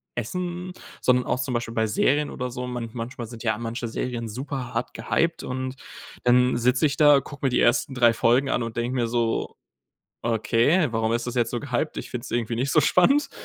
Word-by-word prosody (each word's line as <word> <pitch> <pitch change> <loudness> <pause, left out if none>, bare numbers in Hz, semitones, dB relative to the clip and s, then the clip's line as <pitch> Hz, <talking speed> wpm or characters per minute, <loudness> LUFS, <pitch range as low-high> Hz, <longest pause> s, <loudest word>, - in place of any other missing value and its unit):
Essen, 180 +9 -4 0.3
sondern 125 0 +3
auch - - -1
zum 130 -2 -3
Beispiel 120 -1 -2
bei 110 -1 +1
Serien 145 +7 +1
oder 125 0 -4
so. 125 +1 -5
Man 120 -2 -4
manchmal 120 0 -6
sind 115 0 -10
ja 110 -2 +1
manche 115 +1 -4
Serien 115 0 -3
super 130 +1 -5
hart 115 +2 -3
gehyped 170 0 0
und 130 +1 -4 0.5
dann 125 +1 +4
sitze 125 +4 +2
ich 140 -2 +1
da, 145 -2 +7
gucke 145 +1 -8
mir 135 - +4
die - - +1
ersten 120 +3 +2
3 120 -2 +4
Folgen 125 +4 +2
an - - 0
und 115 0 -6
denke 120 +2 -1
mir 120 -2 +1
so: 115 -1 -1 0.6
„Okay, 120 - +2
warum 115 0 0
ist 120 +1 -2
das 125 - -4
jetzt 120 -2 +1
so 120 - -1
gehyped?“ 145 +2 -2
Ich - - -6
find's 125 0 -6
irgendwie 115 -1 -1
nicht 130 +4 -1
so 155 - +5
spannend. 270 - +3
125 Hz, 210 wpm, -25 LUFS, 115-135 Hz, 0.6 s, da